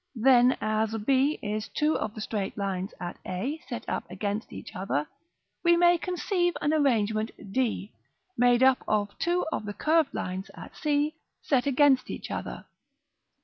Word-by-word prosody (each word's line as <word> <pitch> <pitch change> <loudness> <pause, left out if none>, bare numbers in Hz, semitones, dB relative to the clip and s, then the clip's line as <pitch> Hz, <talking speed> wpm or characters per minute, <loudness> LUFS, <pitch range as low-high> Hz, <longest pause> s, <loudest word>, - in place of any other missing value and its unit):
Then, 250 +1 +5
as 215 +1 0
b 275 +4 +3
is 215 +1 -2
two 305 +1 +1
of 210 - -3
the 215 - -6
straight 205 -2 -3
lines 195 -1 -2
at 175 -1 -6
a, 250 - -3
set - - -5
up - - -3
against 205 +1 -3
each - - -9
other, 180 -6 -1 0.6
we 345 0 +5
may 345 0 +5
conceive 350 -2 0
an 295 +1 +1
arrangement, 220 -7 +2 0.2
d, 235 -5 -1 0.4
made 245 +1 +4
up 265 0 +4
of 205 -1 0
two 350 +1 +1
of - - -2
the 205 0 -5
curved 315 -2 +2
lines 185 +2 -4
at - - -11
c, 300 0 +1 0.3
set 265 -2 +1
against 275 -1 +4
each - - -6
other. - - -5
245 Hz, 160 wpm, -28 LUFS, 210-300 Hz, 0.6 s, Then